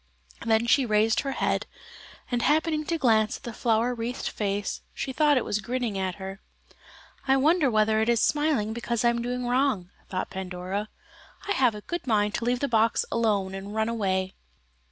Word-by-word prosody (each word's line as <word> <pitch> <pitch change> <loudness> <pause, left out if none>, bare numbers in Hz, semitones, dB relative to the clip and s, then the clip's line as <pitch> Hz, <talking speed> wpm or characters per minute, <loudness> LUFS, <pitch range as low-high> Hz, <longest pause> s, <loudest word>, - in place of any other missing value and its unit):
Then 225 0 +2
she 250 +4 +4
raised 220 -1 +2
her 275 -1 -2
head, - - -1 0.6
and 240 -1 +1
happening 310 +2 +1
to 335 - -1
glance 220 -6 +2
at - - -23
the 235 - -6
flower 230 +2 +1
wreathed 240 +1 -3
face, 205 -1 -2
she 265 - -3
thought 295 0 +4
it 250 - 0
was 210 - -1
grinning 240 0 -2
at 190 -2 -2
her. 195 +1 -8 0.9
"I 270 0 +5
wonder 305 +1 +3
whether 215 -1 +2
it 220 - +1
is 235 -1 +3
smiling 295 -8 +1
because 235 0 -2
I - - +6
am 235 0 0
doing 250 +1 -3
wrong," 245 -7 +1 0.2
thought 185 - -3
Pandora, 190 +2 -4 0.6
"I - - -1
have 250 - +3
a 210 - -7
good 345 +5 -5
mind 210 -2 +2
to 235 - -2
leave 245 0 0
the 280 - +1
box 225 -2 +2
alone 205 -5 +1
and 195 +2 -7
run 220 +1 +1
away." 190 -4 -1
230 Hz, 190 wpm, -26 LUFS, 210-255 Hz, 0.9 s, I